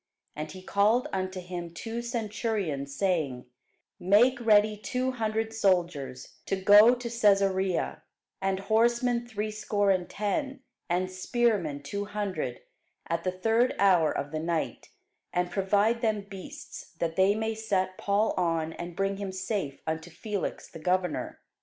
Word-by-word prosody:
And 150 0 -5
he 185 +3 -10
called 215 +8 +2
unto 185 0 -2
him 175 -1 -6
two 230 +5 -4
centurions, 215 - -2
saying, 150 -8 0 0.5
Make 230 +7 +4
ready 215 -1 +5
two 250 +5 -2
hundred 225 -2 -2
soldiers 170 -11 0
to - - +1
go 205 +5 +7
to 245 -1 -6
Cæsarea, 195 -5 +2 0.4
and 195 0 0
horsemen 235 +3 +2
threescore 210 -2 0
and 185 -2 0
ten, 265 +7 -2 0.3
and 185 +2 0
spearmen 185 - 0
two 200 +8 -3
hundred, 205 -2 -3 0.5
at 170 0 -1
the 185 - +1
third 225 +6 +2
hour 180 -5 +4
of 140 +1 -3
the 155 - -2
night; 165 0 -2 0.4
and 180 0 0
provide 205 +4 +2
them 215 -3 +1
beasts, 195 -2 -10
that 165 -1 -2
they 190 +2 +4
may 220 +1 -1
set 195 -4 -1
Paul 205 +2 +1
on, 165 -2 0
and 175 0 -7
bring 195 +1 0
him 200 -1 -4
safe 190 -6 -3
unto 160 +2 -3
Felix 200 +4 -4
the 165 - -11
governor. 180 +1 -1
195 Hz, 140 wpm, -28 LUFS, 175-220 Hz, 0.5 s, go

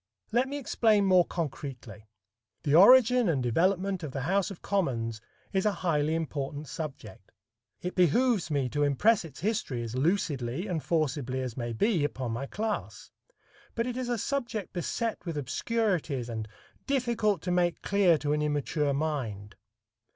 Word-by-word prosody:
Let 245 +4 +2
me 285 - -3
explain 220 -6 +2
more 185 -2 +5
concretely. 130 - -6 0.6
The 145 - +1
origin 245 +4 +7
and 140 -6 +1
development 185 - +1
of 150 -5 -6
the 135 - -3
House 190 +7 +1
of 195 - -10
Commons 115 - -1 0.3
is 190 -1 +2
a 210 - +3
highly 155 -2 +2
important 145 -2 -4
subject. 155 -2 -8 0.5
It 180 - -3
behooves 195 - +3
me 140 -4 0
to 145 +4 -2
impress 160 - +3
its 155 -4 -11
history 185 - -1
as 115 -1 -6
lucidly 145 - 0
and 175 -6 -2
forcibly 145 -6 -1
as 125 -3 -4
may 120 -2 -3
be 175 - +1
upon 130 -4 -2
my 125 +5 -3
class. 215 +4 -4 0.6
But 230 - 0
it 245 -1 -3
is 255 -1 -3
a 240 - 0
subject 235 -5 -3
beset 220 +6 -2
with 170 -4 -4
obscurities 150 - -1
and 110 -2 -4 0.4
difficult 235 - +1
to 180 - -2
make 175 -1 +1
clear 195 -5 +4
to 145 0 -1
an 150 - 0
immature 145 -1 0
mind. 125 -10 -3
165 Hz, 160 wpm, -29 LUFS, 135-205 Hz, 0.6 s, origin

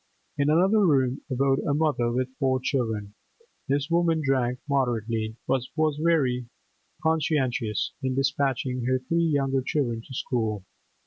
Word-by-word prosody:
In 145 0 +1
another 190 +7 +4
room 135 -6 +2
abode 135 +1 +2
a 145 - 0
mother 145 -6 +1
with 130 +2 -2
four 130 -2 +2
children. 110 -6 -2 0.5
This 140 +1 0
woman 170 -1 +3
drank 125 -2 +1
moderately, 115 -5 -1
but 135 -1 +2
was 155 -2 +1
very 130 -7 +2 0.6
conscientious 140 -9 0
in 130 -1 -1
despatching 135 -2 0
her 130 +1 +2
three 150 +7 -1
younger 135 -4 +1
children 125 -5 -1
to 130 - -12
school. 110 -7 -2
135 Hz, 135 wpm, -26 LUFS, 125-145 Hz, 0.6 s, another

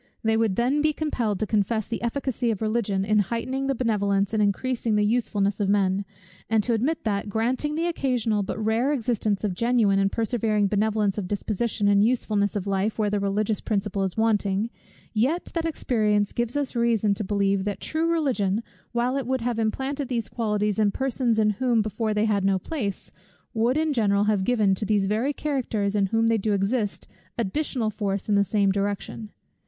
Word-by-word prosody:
They 225 0 +2
would 220 -4 +1
then 260 +7 +1
be 305 0 +2
compelled 240 -11 -1
to - - +2
confess 215 +1 0
the 230 - -4
efficacy 245 0 -1
of 215 -4 -1
Religion, 215 -3 0
in 210 +1 +3
heightening 235 +7 -1
the 275 - 0
benevolence 200 -4 0
and 215 - +2
increasing 225 +2 0
the 210 0 +3
usefulness 205 -3 0
of 200 -2 +1
men: 200 -1 +2 0.4
and 220 -1 +3
to 240 - 0
admit 265 +9 0
that, 205 -1 -1
granting 250 +8 -1
the 330 +2 0
occasional 250 -10 0
but 195 - -4
rare 225 +5 +1
existence 225 -6 -1
of 205 -3 0
genuine 225 -1 +2
and 195 0 +2
persevering 220 -2 0
benevolence 210 -1 +1
of 190 - -4
disposition 210 +1 -1
and 200 0 +5
usefulness 215 -4 +1
of 200 -2 -2
life, 200 +2 -1
where 210 -2 0
the 205 - +1
religious 200 +2 0
principle 200 -2 -1
is 190 0 -2
wanting; 215 -1 +1 0.4
yet 265 +11 0
that 335 -1 -1
experience 215 -9 0
gives 240 +3 -1
us 285 -3 -2
reason 230 -3 +2
to 210 +2 -4
believe, 200 -1 +1
that 205 0 -3
true 325 +1 0
Religion, 235 - 0 0.3
while 245 +3 0
it 270 -3 -3
would 260 -1 0
have 235 -1 -1
implanted 265 +5 -2
these 230 -5 -2
qualities 210 -3 -1
in 210 -1 +4
persons 250 0 0
in 215 -1 +3
whom 235 +1 +1
before 215 +1 -2
they 210 +1 +2
had 205 -3 +1
no 195 0 +3
place, 205 - -4 0.4
would 235 +5 +1
in 310 -1 +1
general 205 -5 +2
have 210 -3 +1
given, 215 -6 +3
to 190 - -2
these 205 -1 +1
very 220 +8 0
characters 250 -9 -1
in 200 -2 +2
whom 225 +3 +1
they 225 -1 +3
do 210 +1 0
exist, 205 +2 -1 0.3
additional 235 +1 -1
force 200 -2 -3
in 210 - +1
the 200 0 +4
same 200 0 +2
direction. 200 +2 -3
215 Hz, 190 wpm, -25 LUFS, 200-240 Hz, 0.4 s, and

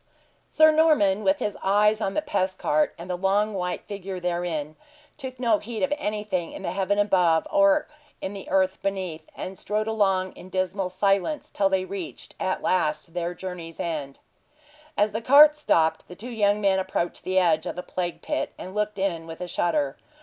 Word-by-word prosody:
Sir 315 0 +6
Norman, 300 -11 +3
with 190 0 +3
his 205 - -2
eyes 210 +3 +3
on 195 -2 -1
the 305 - 0
pest 190 -11 -1
cart, 150 +1 +1
and 170 - -9
the 180 - -2
long 200 +3 +1
white 180 -2 -3
figure 195 -2 -6
therein, 170 -4 -2 0.4
took 260 -3 -8
no 230 -4 +3
heed 225 +2 -5
of 280 +1 +2
anything 210 - -3
in - - -8
the 170 - -2
heaven 195 +2 0
above 180 -5 +3
or 300 0 +4 0.3
in 190 - -4
the 195 -2 -8
earth 190 0 +1
beneath, 185 -5 -3
and 190 0 -6
strode 210 +1 -1
along 195 -4 +1
in 185 - -13
dismal 185 0 -1
silence 195 - 0
till 195 -1 +2
they 190 -1 +1
reached, 190 -3 -7
at 185 - -1
last, 155 -2 0
their 175 0 -3
journey's 175 -3 -7
end. 150 -5 -3 0.8
As 205 +1 +3
the 220 - -3
cart 290 +5 +8
stopped 165 - +1
the 180 - -10
two 240 +7 -7
young 210 -2 +2
men 195 -2 +2
approached 185 -2 -2
the 185 0 -1
edge 165 -3 +3
of - - -4
the 180 - -5
plague 175 -2 -4
pit, - - -2
and 185 - -8
looked 210 0 -1
in 175 -4 -2
with 165 0 -8
a 180 - -4
shudder. 160 -5 0
190 Hz, 190 wpm, -25 LUFS, 180-210 Hz, 0.8 s, cart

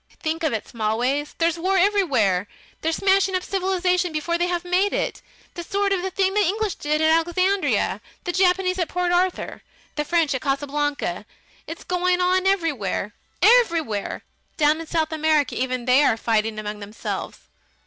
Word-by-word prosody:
"Think 325 +1 -2
of 315 -3 +1
it, 220 - -3
Smallways: 245 +6 -1
there's 335 0 +1
war 380 +3 +1
everywhere! 285 - +2 0.3
They're 325 - 0
smashing 385 +2 +2
up 365 - -1
their - - -13
civilisation 365 -1 +1
before 325 +2 -2
they 350 - +1
have 355 0 -2
made 370 +3 +1
it. - - -2 0.3
The 345 - -6
sort 400 +3 -1
of 375 - 0
thing 385 -1 +2
the 420 - +2
English 410 +2 0
did 300 +1 -1
at 315 0 +4
Alexandria, 370 +3 0 0.2
the 355 - -2
Japanese 365 0 +2
at 345 - -1
Port 360 -1 -1
Arthur, 360 +1 0 0.4
the 295 - +1
French 325 -1 +1
at 260 - -3
Casablanca, 290 +1 -2 0.4
is 330 - -7
going 360 0 0
on 370 +1 +2
everywhere. 285 - -1 0.3
Everywhere! 335 - +2 0.3
Down 305 +1 +3
in 330 - -9
South 320 -1 -1
America 310 -2 +1
even 255 -1 -2
they 255 +3 +5
are 225 - +3
fighting 220 -1 0
among 210 0 -5
themselves! 210 +2 -6
335 Hz, 170 wpm, -23 LUFS, 280-365 Hz, 0.4 s, they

